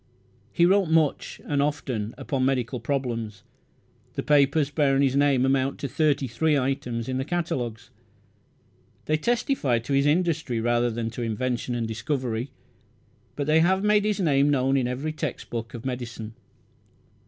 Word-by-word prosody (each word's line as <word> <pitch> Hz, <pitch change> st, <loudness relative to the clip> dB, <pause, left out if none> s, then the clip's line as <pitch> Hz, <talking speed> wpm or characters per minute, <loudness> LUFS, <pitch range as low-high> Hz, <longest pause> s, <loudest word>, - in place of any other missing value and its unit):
He 170 Hz, -, +3 dB
wrote 195 Hz, +1 st, +4 dB
much, 160 Hz, -3 st, +1 dB
and 145 Hz, -1 st, 0 dB
often, 125 Hz, -7 st, -2 dB
upon 135 Hz, -2 st, -2 dB
medical 130 Hz, -1 st, 0 dB
problems. 115 Hz, -5 st, -3 dB, 0.7 s
The -, -, -3 dB
papers 145 Hz, 0 st, +3 dB
bearing 140 Hz, -2 st, +2 dB
his 135 Hz, -1 st, +2 dB
name 140 Hz, -2 st, +3 dB
amount 135 Hz, 0 st, +1 dB
to 140 Hz, -, -2 dB
thirty 145 Hz, 0 st, +1 dB
three 150 Hz, +6 st, +1 dB
items 125 Hz, -3 st, -2 dB
in 130 Hz, 0 st, -2 dB
the -, -, 0 dB
catalogues. 135 Hz, -9 st, -3 dB, 1.1 s
They 155 Hz, -, +1 dB
testify 235 Hz, -, +1 dB
to 120 Hz, +5 st, -3 dB
his 140 Hz, +1 st, +3 dB
industry 155 Hz, -7 st, +1 dB
rather 120 Hz, +1 st, +1 dB
than 115 Hz, 0 st, -3 dB
to 120 Hz, -, -6 dB
invention 120 Hz, +2 st, -2 dB
and 115 Hz, -2 st, -2 dB
discovery, 115 Hz, +2 st, -2 dB, 0.9 s
but 145 Hz, -, -2 dB
they 155 Hz, +2 st, +4 dB
have 190 Hz, +4 st, +3 dB
made 210 Hz, 0 st, +3 dB
his 210 Hz, -1 st, 0 dB
name 145 Hz, -5 st, +3 dB
known 135 Hz, -1 st, +2 dB
in 130 Hz, -3 st, +1 dB
every 135 Hz, +5 st, -3 dB
text 155 Hz, -, -5 dB
book 115 Hz, 0 st, -5 dB
of 120 Hz, -, -8 dB
medicine. 120 Hz, -3 st, -5 dB
135 Hz, 155 wpm, -25 LUFS, 120-150 Hz, 1.1 s, wrote